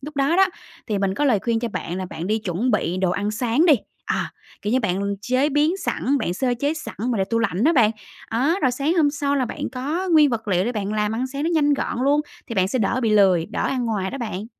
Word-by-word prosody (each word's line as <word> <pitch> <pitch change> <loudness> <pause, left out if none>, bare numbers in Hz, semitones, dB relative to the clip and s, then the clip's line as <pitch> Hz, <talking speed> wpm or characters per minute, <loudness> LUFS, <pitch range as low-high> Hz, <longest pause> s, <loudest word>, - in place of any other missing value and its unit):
Lúc 295 +2 -9
đó 280 +5 +2
đó, 385 - +7 0.4
thì 210 -3 -1
mình 195 -1 0
có 290 - 0
lời 240 -7 +3
khuyên 230 -1 0
cho 235 - -2
bạn 180 -4 -4
là 190 - -3
bạn 165 - -5
đi 215 +2 +1
chuẩn 210 +4 -1
bị 180 -6 0
đồ 185 -1 +1
ăn 205 +3 -1
sáng 245 +9 +1
đi, 305 - +7 0.3
à, - - -2 0.3
kiểu 210 - -1
như, 260 - +3
bạn 200 0 -1
chế 255 +6 +1
biến 300 +5 +2
sẵn, 285 -7 -1
bạn 175 - -2
sơ 250 +4 0
chế 290 +3 +1
sẵn 310 - -7 0.2
mà 230 - 0
để 190 - +2
tủ 230 +3 -1
lạnh 205 -1 0
đó 325 - +5
bạn. 235 -7 +4 0.4
Đó, 285 - +1
rồi 260 - +4
sáng 285 +7 0
hôm 300 -4 +4
sau 285 -1 -1
là 260 - +1
bạn 235 - -5
có 305 +9 -2
nguyên 300 -3 +6
vật 225 -2 -3
liệu 185 -1 +2
để 245 - -1
bạn 210 -2 -3
làm 210 0 0
ăn 250 +3 -1
sáng 275 +2 -5
nó 325 - 0
nhanh 290 -2 +3
gọn 255 - -3
luôn 290 +2 +3 0.3
thì 230 - -6
bạn 190 -2 +2
sẽ 255 - -1
đỡ 230 +3 +1
bị 225 - +2
lười, 190 -5 +4
đỡ 210 - -3
ăn 255 -2 -1
ngoài 205 -5 -1
đó 275 - -6
bạn. 215 -4 -4
240 Hz, 275 wpm, -22 LUFS, 205-285 Hz, 0.4 s, đó